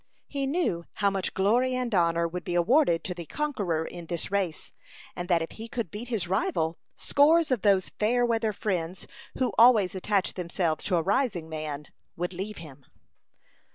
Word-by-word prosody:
He 275 -1 -3
knew 270 - 0
how 200 -1 +1
much 195 -1 -2
glory 240 +7 +2
and 250 -2 -2
honor 170 -2 +2
would 175 +2 -5
be 175 - -3
awarded 175 - +3
to 180 - -3
the 170 -2 -8
conqueror 200 - -1
in 175 -1 -8
this 170 +2 -3
race, 190 -5 -2 0.4
and 175 +1 -5
that 170 -2 +3
if 165 - -7
he 225 +1 -8
could 230 -7 -4
beat 220 +4 -6
his 220 -8 -1
rival, 170 -4 0 0.2
scores 310 +2 +4
of 250 -6 +1
those 195 -3 +3
fair 240 +3 +3
weather 225 -2 +1
friends, 185 -4 -3 0.3
who 250 -5 0
always 225 -6 +6
attach 195 0 0
themselves 170 -3 -2
to 185 - +1
a 165 - +2
rising 200 -4 0
man, 155 -2 -5 0.3
would 175 +2 -3
leave 195 +4 -5
him. 140 -5 -12
190 Hz, 180 wpm, -27 LUFS, 170-230 Hz, 0.4 s, always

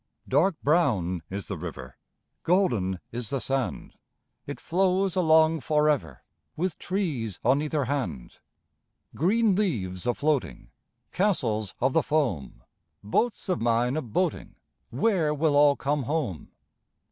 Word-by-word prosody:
Dark 180 0 +2
brown 110 - +2
is 100 +1 -5
the 95 -5 -5
river, 70 -7 -8 0.5
Golden 120 - +1
is 120 -2 -5
the 135 - -1
sand. 135 0 -3 0.5
It - - -6
flows 190 +1 +1
along 160 -2 +4
for 150 +1 +1
ever, 145 - -4 0.3
With 180 0 -2
trees 150 - -2
on 135 +4 +4
either 150 -2 -1
hand. 105 - -4 0.7
Green 205 +5 +2
leaves 105 - -2
a 120 - +1
floating, 150 -2 -1 0.4
Castles 120 - 0
of 130 +1 +1
the 165 - +4
foam, 135 - -2 0.4
Boats 210 - -1
of 185 -8 -1
mine 120 +2 +1
a 155 - 0
boating— 155 - -2 0.3
Where 155 - +1
will 150 0 +1
all 145 0 +6
come 145 +1 -1
home? 135 - -3
145 Hz, 130 wpm, -26 LUFS, 115-165 Hz, 0.7 s, all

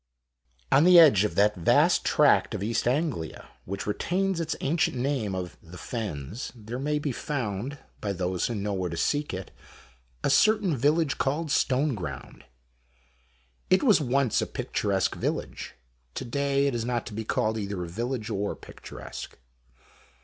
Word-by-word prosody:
On 145 - +6
the 180 +1 +7
edge 145 - +8
of 105 - -3
that 105 +1 +4
vast 85 -3 +3
tract - - +3
of - - -3
East 115 +2 0
Anglia, 125 - -2 0.2
which 100 +2 -5
retains 185 - -1
its 165 -1 -2
ancient 155 -2 0
name 125 -7 -1
of 90 -1 -5
the 85 +2 -12
Fens, 100 - -5
there 115 +2 -7
may 150 +2 0
be 145 -1 -2
found, 125 -1 -3 0.2
by 100 - -2
those 90 -1 -1
who 120 - -3
know 100 0 -2
where 95 -2 -2
to 85 - -5
seek 145 - 0
it, 95 -1 -6 0.7
a - - +2
certain 205 +1 +4
village 145 +3 +1
called 145 +6 0
Stoneground. 125 - -1 1.3
It 185 - +4
was 215 - +5
once 135 -3 +1
a - - -2
picturesque 100 -2 -1
village. - - -4 0.4
To - - -4
day 140 +2 +1
it 140 - +1
is 115 -1 -1
not 120 -1 -2
to - - -8
be 110 +2 -4
called 110 0 0
either 100 -3 -3
a - - -5
village, 115 +5 -3
or 100 0 -2
picturesque. - - -10
120 Hz, 160 wpm, -27 LUFS, 100-145 Hz, 1.3 s, edge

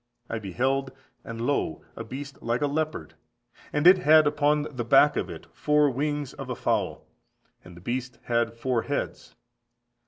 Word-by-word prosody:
I 115 - -2
beheld, 130 +7 -1 0.3
and 115 0 -7
lo 125 - -1
a - - -6
beast 135 +4 -8
like 115 +3 -1
a - - +4
leopard, 145 - -2 0.6
and 150 +2 0
it 185 +1 +8
had 155 -2 +6
upon 150 0 +2
the 130 -5 -5
back 135 +5 +5
of 90 - -2
it 85 -2 -9
four 150 -1 +3
wings 145 +1 -2
of - - -8
a - - -2
fowl, - - -1 0.6
and 90 -1 -13
the - - -13
beast 125 +3 -4
had 115 -1 0
four 120 0 0
heads. - - -4
130 Hz, 165 wpm, -26 LUFS, 115-150 Hz, 0.6 s, it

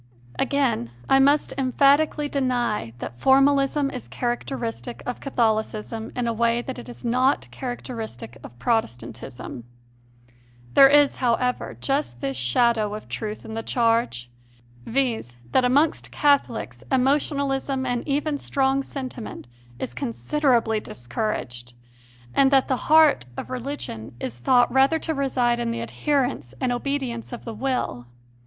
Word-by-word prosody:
Again, 265 - +1 0.2
I 270 - +5
must 285 +2 +4
emphatically 285 +3 +3
deny 245 - -1
that 120 0 -7
formalism 275 +1 +3
is 255 - -7
characteristic 240 -1 -3
of 245 - -4
Catholicism 220 -3 -1
in 245 - -1
a 230 - 0
way 235 +1 +1
that 260 -1 -6
it 245 - -10
is 245 - -10
not 255 +3 +2
characteristic 225 - -6
of 120 - -11
Protestantism. 120 - -3 1.1
There 275 - +9
is, 290 0 +4
how 240 -3 +2
ever, 250 +1 -2
just 275 - -1
this 135 +1 -3
shadow 210 - +2
of 215 - -9
truth 215 -1 -5
in 220 - -7
the 225 - -3
charge; 225 - 0 0.6
viz., 230 - -1 0.2
that 260 - +4
amongst 285 +6 +2
Catholics 235 - +1
emotionalism 270 0 +1
and 245 -2 -1
even 290 +1 0
strong 270 0 +1
sentiment 260 -4 -7 0.3
is 120 - -5
considerably 220 - +1
discouraged, 120 - -4 0.6
and 270 -1 +5
that 270 -1 +4
the 260 +1 -2
heart 310 - +6
of - - -6
religion 245 - -5
is 120 -2 -5
thought 245 - +3
rather 270 +4 +4
to 320 0 -3
reside 255 -4 +1
in 235 -1 -1
the 230 0 -3
adherence 255 - -1
and 255 - 0
obedience 245 -2 -3
of 240 - -8
the 230 - -5
will. 220 - -2
245 Hz, 135 wpm, -24 LUFS, 220-275 Hz, 1.1 s, There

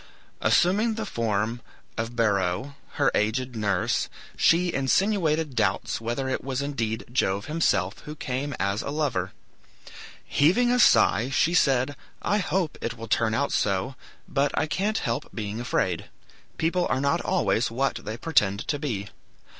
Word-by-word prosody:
Assuming 210 +6 +3
the 220 0 -3
form 115 - -1 0.3
of 115 +1 -4
Beroe, 100 +2 0 0.2
her - - +2
aged 125 +4 0
nurse, 100 -4 0 0.3
she 175 +1 +3
insinuated 160 0 +1
doubts 105 0 0
whether 120 +4 -2
it 130 - -2
was 135 -1 -2
indeed 115 -6 -2
Jove 100 -5 0
himself 105 - 0
who 150 - -8
came 135 0 -3
as 100 +3 0
a - - -5
lover. 140 -11 -1 0.9
Heaving 225 +12 +3
a 250 - +2
sigh, 110 - +5
she 155 +5 +2
said, 135 -4 +3 0.3
"I 205 - +2
hope 180 -4 -1
it 115 0 -3
will 115 0 -7
turn 110 +1 +1
out 140 +4 0
so, 100 +6 0 0.3
but 140 0 +1
I 150 - +2
can't 200 +7 -1
help 115 -1 -2
being 110 +1 -4
afraid. 95 -8 -1 0.5
People 175 +2 +1
are 130 - +1
not 140 +5 +1
always 160 -10 +1
what 135 +4 0
they 110 +2 -5
pretend 105 -10 +1
to 145 - 0
be. 110 -9 -3
130 Hz, 150 wpm, -26 LUFS, 110-155 Hz, 0.9 s, sigh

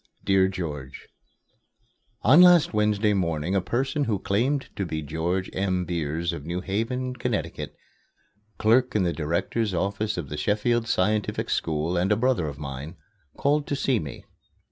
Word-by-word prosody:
DEAR 95 -1 +4
GEORGE: 75 -8 -6 1.1
On 140 +10 +7
last 175 -6 +6
Wednesday 105 0 +2
morning 85 -2 -1
a 100 - +2
person 130 - -1
who 110 -5 0
claimed 125 +9 0
to 100 - -2
be 80 -4 -3
George 85 +5 -2
M. 95 -1 0
Beers 85 0 -2
of 75 - -6
New 85 +3 -3
Haven, 120 +7 -2
Ct., 120 -4 -3 0.9
clerk 125 +3 +3
in 105 - +3
the 85 -1 0
Director's 90 +6 -1
Office 100 +4 -1
of 80 -6 -4
the 75 - -5
Sheffield 115 +4 +1
Scientific 105 +2 0
School 80 +3 0
and 90 +4 +1
a - - +5
brother 120 -8 +1
of 70 -2 -6
mine, 70 +4 -7 0.4
called 145 +1 +1
to 140 - -1
see 135 -4 +1
me. 70 -5 -8
95 Hz, 155 wpm, -25 LUFS, 85-115 Hz, 1.1 s, On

